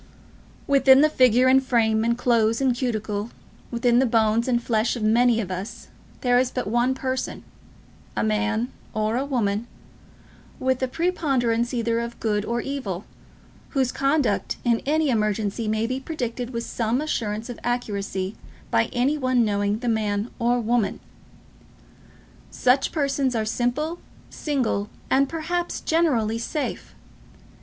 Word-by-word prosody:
Within 270 -1 +6
the 305 0 +4
figure 255 -2 +4
and 265 +1 +5
frame 225 -4 +2
and 235 +1 +1
clothes 230 -2 +2
and 260 -3 +2
cuticle, 215 -4 -2 0.4
within 240 0 +2
the 260 - +3
bones 225 0 +2
and 240 -2 +2
flesh 230 0 0
of 235 - -4
many 230 +2 +4
of 190 -4 -3
us, 185 +3 -6 0.3
there 245 -1 +4
is 255 0 +1
but 250 - -3
one 240 +5 +1
person, 260 0 -3 0.7
a - - +1
man 220 +3 0 0.2
or 220 +4 0
woman, 235 -5 -1 0.9
with 260 0 0
a 260 - +1
preponderance 255 -8 0
either 230 -2 0
of 235 0 -5
good 210 -2 0
or 235 +1 -1
evil, 220 -10 -4 0.7
whose 260 -2 +2
conduct 275 -6 0
in 235 -2 +2
any 305 -1 +2
emergency 215 0 0
may 220 +1 0
be 255 +3 -2
predicted 250 -4 -4
with 235 -2 -4
some 235 +2 -1
assurance 225 -7 -2
of 245 -3 -7
accuracy 200 -5 -2 0.4
by - - +3
any 270 +5 0
one 255 -3 +2
knowing 205 0 0
the 245 +2 -5
man 215 -1 0
or 240 +1 +2
woman. 235 -1 0 1.5
Such 255 +2 +2
persons 275 -4 0
are 220 -1 0
simple, 250 +9 -1 0.3
single, 250 -8 -1 0.2
and, 275 +1 +3
perhaps, 340 +2 -2
generally, 245 -10 +1
safe. 295 +5 -4
240 Hz, 140 wpm, -24 LUFS, 220-260 Hz, 1.5 s, Within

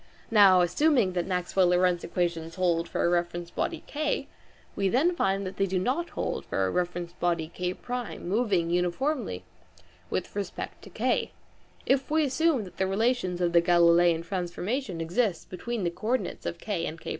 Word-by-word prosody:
Now 195 -4 +7
assuming 240 - +3
that 175 -1 -1
the - - -9
Maxwell 180 0 +2
Lorentz 180 0 +2
equations 170 -2 -2
hold 175 -2 +1
for - - 0
a - - +4
reference 175 0 -1
body 335 - -3
K, 300 0 -2 0.5
we 195 -1 +1
then 320 - +2
find 195 - 0
that 185 0 -6
they 195 - +2
do 185 0 -1
not 265 - -1
hold - - -2
for - - -1
a - - -1
reference 175 -1 -2
body 170 -2 -1
K1 225 +7 -4
moving 190 -4 +1
uniformly 180 - -1 0.7
with 185 - -3
respect 205 -1 -5
to - - -11
K, - - 0 0.5
if 270 0 +1
we 310 +1 +3
assume 285 -2 +2
that 185 - -12
the 190 - +1
relations 195 -3 0
of 175 -1 +1
the 170 - +6
Galileian 170 -1 +4
transformstion 185 +4 -3
exist 175 +2 -1
between 225 +4 -4
the 170 - 0
co 180 +5 -8
ordinates 240 -5 -1
of 170 - -3
K 195 -6 -3
and 160 - -6
K1. - - -7
185 Hz, 180 wpm, -28 LUFS, 175-235 Hz, 0.7 s, Now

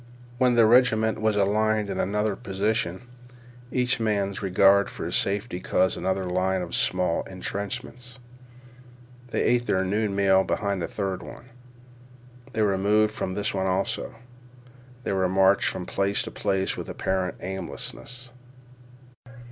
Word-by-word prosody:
When 125 -1 +4
the 115 -1 +6
regiment 110 -2 +4
was 110 -1 +2
aligned 105 +1 +2
in - - -3
another 105 +1 0
position 95 0 -2 0.7
each 125 -1 +1
man's 100 -3 -1
regard 100 +1 +4
for - - -6
his - - -1
safety 100 -1 0
caused 95 0 +1
another 95 0 -1
line 90 +1 0
of 85 - -8
small 90 -2 +1
intrenchments. 115 +6 -5 1.1
They - - -1
ate 120 0 +2
their 95 0 +1
noon 105 +1 0
meal 95 -1 +4
behind 100 -2 -1
a 85 - -2
third 95 -3 -3
one. 125 - -11 1.0
They 110 -1 +1
were 100 -2 +1
moved 105 +2 +3
from 95 - -3
this 105 +1 -1
one 95 -1 0
also. 95 +4 -1 0.9
They - - -1
were 95 -1 +1
marched 95 +1 +4
from 90 - -5
place 100 +2 0
to - - -7
place 95 -1 -1
with - - -6
apparent 95 -1 -1
aimlessness. 120 +6 -6
100 Hz, 140 wpm, -26 LUFS, 95-110 Hz, 1.1 s, the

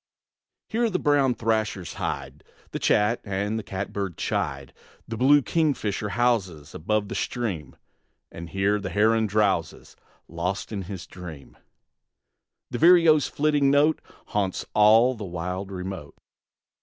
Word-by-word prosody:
Here 230 +1 0
the 185 - 0
brown 145 -6 +2
thrashers 110 -5 -1
hide, - - -5 0.3
The - - -4
chat 105 +3 +2
and 105 +2 -2
cat 95 0 -5
bird 100 -4 -3
chide; 70 -1 -3 0.3
The 115 - -4
blue 140 +4 +5
kingfisher 125 -11 0
houses 95 -11 0
Above 105 +5 -1
the - - -6
stream, 95 - -3 0.6
And 85 0 -8
here 100 +3 +1
the 95 -2 -5
heron 110 +4 +2
drowses 100 -6 -1 0.3
Lost 90 +5 -3
in 100 -3 -3
his 95 -2 -7
dream; 85 -7 -11 1.2
The - - -3
vireo's 165 -3 +6
flitting 145 -2 +2
note 145 +3 +3 0.3
Haunts 100 -3 -1
all 110 +4 +5
the 110 -4 -8
wild 90 +2 -4
remote. 90 -5 -6
105 Hz, 130 wpm, -25 LUFS, 95-125 Hz, 1.2 s, vireo's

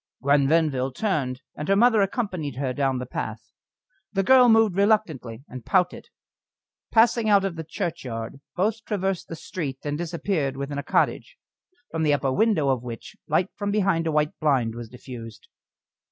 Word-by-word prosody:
Gwen 140 0 +4
Venville 145 -4 +2
turned, 135 -7 -2
and 150 - -5
her 195 - +4
mother 225 0 +5
accompanied 190 - -2
her 130 -1 -2
down 135 0 0
the 125 - -4
path. - - -6 0.6
The 195 - 0
girl 250 +3 +6
moved 225 -4 +4
reluctantly, 175 - +1
and 130 -1 -9
pouted. 180 - +1 0.8
Passing 230 0 +4
out 200 -1 +5
of 190 -3 -2
the 165 - -5
churchyard, 135 -6 -5
both 215 +4 0
traversed 195 -3 -2
the 165 - -6
street 150 -4 -5
and 145 +1 -3
disappeared 165 -5 -2
within 140 +1 -4
a - - -4
cottage, - - 0 0.5
from 165 - -2
the 150 -2 +3
upper 135 -1 -1
window 205 -7 +2
of 130 -3 +1
which 125 - -8
light 185 +2 +1
from 205 -1 -3
behind 195 -5 +1
a - - +1
white 150 0 +1
blind 130 -7 +1
was 120 -1 -8
diffused. 120 -3 -10
160 Hz, 170 wpm, -25 LUFS, 135-200 Hz, 0.8 s, girl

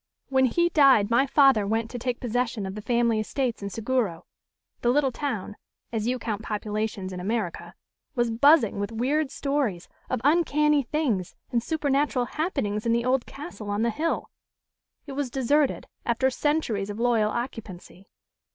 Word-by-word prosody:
When 265 -1 +4
he 345 +8 +2
died 270 -10 +5
my 265 +4 +4
father 270 -8 +4
went 225 +1 -1
to 245 - -5
take 245 0 -2
possession 240 -3 -1
of 190 - -5
the 215 - -6
family 235 -1 +1
estates 240 +2 -2
in 200 - -4
Seguro. 225 -6 -1 0.6
The 240 - +2
little 270 +1 +3
town 220 -7 -4 0.3
as 225 -1 -2
you 255 +1 +1
count 220 -3 -4
populations 210 -3 -3
in 180 - -5
America 180 -4 -3 0.4
was 240 -2 +1
buzzing 240 -3 +4
with 205 +2 -2
weird 270 +6 0
stories 275 -13 -2 0.2
of 255 - 0
uncanny 300 -1 +3
things 240 - -1 0.2
and 235 -2 +1
supernatural 285 -3 0
happenings 240 - -2
in 230 - +3
the 235 0 +1
old 255 0 +1
castle 275 -8 -8
on 205 +2 0
the 235 - +2
hill. 320 +8 -2 0.7
It 285 - -8
was 275 -1 -2
deserted, 270 +3 +1 0.2
after 250 +3 +1
centuries 245 -8 0
of 205 +2 -5
loyal 230 -3 +2
occupancy. 215 -6 -6
240 Hz, 160 wpm, -26 LUFS, 215-275 Hz, 0.7 s, died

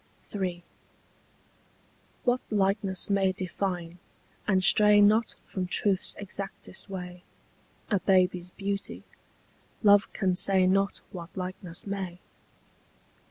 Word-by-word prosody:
III. 180 -3 -3 1.6
What 245 0 +1
likeness 195 -2 +1
may 195 -1 +3
define, 180 -2 -4 0.5
and 190 -2 +2
stray 210 +1 +6
not 215 +2 +4
From 185 -2 -4
truth's 195 +1 +2
exactest 195 0 -6
way, 180 -2 -7 0.7
A 205 - +3
baby's 180 -2 +2
beauty? 200 +1 -5 0.8
Love 205 -1 +5
can 185 -3 0
say 190 0 +4
not 195 +2 +1
What 175 -1 -9
likeness 180 -1 -5
may. 190 -3 -5
190 Hz, 100 wpm, -28 LUFS, 180-200 Hz, 1.6 s, stray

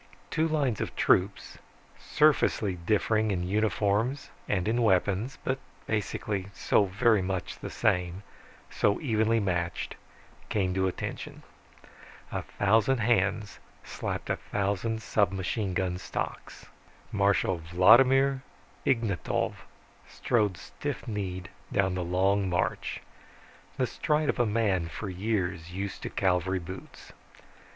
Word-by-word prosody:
Two 160 +1 +2
lines 140 -8 0
of - - -4
troops, 95 +2 +1 0.4
surfacely 150 -9 +2
differing 110 0 +2
in 90 -3 -1
uniforms 110 +5 0 0.2
and 95 -2 0
in 120 +2 +1
weapons, 105 +4 +1
but 130 0 -1 0.3
basically 105 -2 -2
so 105 - +3
very 105 +2 +3
the 95 -1 -4
same, 90 +1 0 0.5
so 100 - +2
evenly 115 -4 +2
matched, 90 -4 -2 0.6
came 95 -3 0
to 95 0 +1
attention. 95 - -5 0.9
A - - -2
thousand 110 +6 +2
hands 105 -2 +1 0.2
slapped - - -4
a - - 0
thousand 105 +3 -2
submachine 95 0 0
gun 90 -1 -1
stocks. - - -5 0.5
Marshal 100 -3 +2
Vladimir 130 +11 +5 0.5
Ignatov 115 -8 0 0.6
strode 105 -6 +1
stiff - - -6
kneed 95 -5 -4 0.2
down 95 -2 +2
the 90 -1 -2
long 95 +2 +1
march, 90 - -1 0.8
the - - +2
stride 150 0 0
of - - 0
a 120 - +3
man 105 -6 +1
for 95 +5 -5
years 90 -4 -2
used 100 +1 -4
to - - -4
cavalry 95 0 +1
boots. 90 +1 -9
100 Hz, 115 wpm, -28 LUFS, 95-115 Hz, 0.9 s, Vladimir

